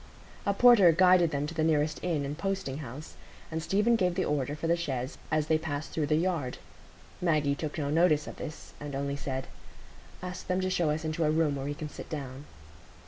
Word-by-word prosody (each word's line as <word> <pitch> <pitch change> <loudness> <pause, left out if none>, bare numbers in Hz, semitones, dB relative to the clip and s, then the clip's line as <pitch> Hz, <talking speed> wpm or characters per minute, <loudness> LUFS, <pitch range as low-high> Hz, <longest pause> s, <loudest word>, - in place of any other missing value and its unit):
A 200 - +3
porter 225 -7 +7
guided 180 0 +5
them 145 -1 -1
to 155 - -5
the 160 -1 0
nearest 155 -1 +1
inn 160 -5 0
and 140 +1 -4
posting 180 -5 -3
house, 145 +2 -8 0.4
and 160 0 -2
Stephen 210 +7 +2
gave 180 -5 +1
the 185 - 0
order 145 -1 -1
for 155 - -5
the 170 +1 +3
chaise 135 -6 -3
as 155 -1 +1
they 155 0 +2
passed 155 -1 -4
through 155 -2 -1
the 150 - +3
yard. 160 -6 -1 0.6
Maggie 155 -5 +2
took 150 +1 -4
no 145 -2 -1
notice 155 -2 +3
of - - -8
this, 155 - -8
and 145 -1 -6
only 140 0 -2
said, 135 -2 -4 0.8
"Ask 180 +1 -6
them 185 0 +1
to 185 0 -1
show 170 -4 +1
us 155 +2 -1
into 155 +1 -1
a 155 - +3
room 155 -2 +2
where 135 -1 -4
we 145 +1 -3
can 155 0 -5
sit 150 - -9
down." 140 -2 -6
155 Hz, 215 wpm, -29 LUFS, 145-175 Hz, 0.8 s, porter